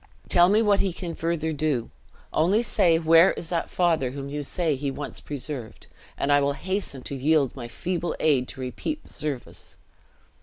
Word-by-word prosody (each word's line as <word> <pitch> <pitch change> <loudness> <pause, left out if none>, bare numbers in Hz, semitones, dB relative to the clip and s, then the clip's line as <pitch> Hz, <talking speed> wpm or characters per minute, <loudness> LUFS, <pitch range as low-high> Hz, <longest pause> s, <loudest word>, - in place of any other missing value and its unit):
Tell 175 0 +6
me 215 +3 +4
what 205 -2 +3
he 190 -3 0
can 170 -1 -5
further 160 -1 -1
do. 145 -6 -1 0.4
Only 190 +9 +3
say, 170 -7 +3
where 165 +2 +6
is 165 - -7
that 170 -2 -1
father 165 -7 +1
whom 140 +1 -6
you 145 +1 -3
say 160 +1 0
he 140 +1 -2
once 145 +1 -6
preserved, 135 -5 -6 0.3
and 145 - 0
I 145 0 +5
will 140 0 +1
hasten 185 -5 -4
to 140 - -5
yield 140 0 +2
my 120 -3 -6
feeble 175 +6 -3
aid 135 -5 +2
to 135 - -8
repeat 300 - -4
the - - -10
service!" 145 -5 -5
155 Hz, 185 wpm, -25 LUFS, 140-175 Hz, 0.4 s, Tell